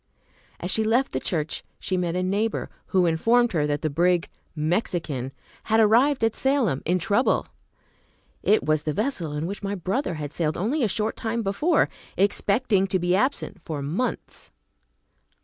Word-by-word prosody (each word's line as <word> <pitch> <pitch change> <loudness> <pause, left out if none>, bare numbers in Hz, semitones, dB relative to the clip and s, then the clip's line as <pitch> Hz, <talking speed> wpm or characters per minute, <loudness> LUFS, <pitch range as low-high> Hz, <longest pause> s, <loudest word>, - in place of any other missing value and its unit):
As 180 - -3
she 220 - +2
left 235 +5 +2
the 130 - -1
church 155 0 -2 0.2
she 185 - -2
met 175 -1 -1
a 180 - 0
neighbor 205 +4 -1 0.2
who 185 -2 +2
informed 230 +9 +3
her 150 -4 +1
that 145 +1 -2
the 155 - +1
brig 175 +3 +2 0.3
"Mexican" 155 - -1 0.3
had 220 +1 +3
arrived 235 +5 +4
at 225 -1 +2
Salem, 265 - +1
in 180 +3 +2
trouble. 200 +7 +1 1.0
It 215 - +3
was 155 -1 +2
the 150 - -2
vessel 200 - -1
in 150 +2 -2
which 200 +4 -5
my 200 0 -2
brother 190 - -2
had 150 -2 -6
sailed 155 -2 -1
only 240 - 0
a 230 - +3
short 210 +2 -1
time 230 0 -2
before, 200 - +2 0.3
expecting 200 +1 +2
to 190 - +1
be 180 0 +1
absent 205 -4 -1
for 150 -4 -5
months. 195 - -3
190 Hz, 165 wpm, -25 LUFS, 165-225 Hz, 1.0 s, arrived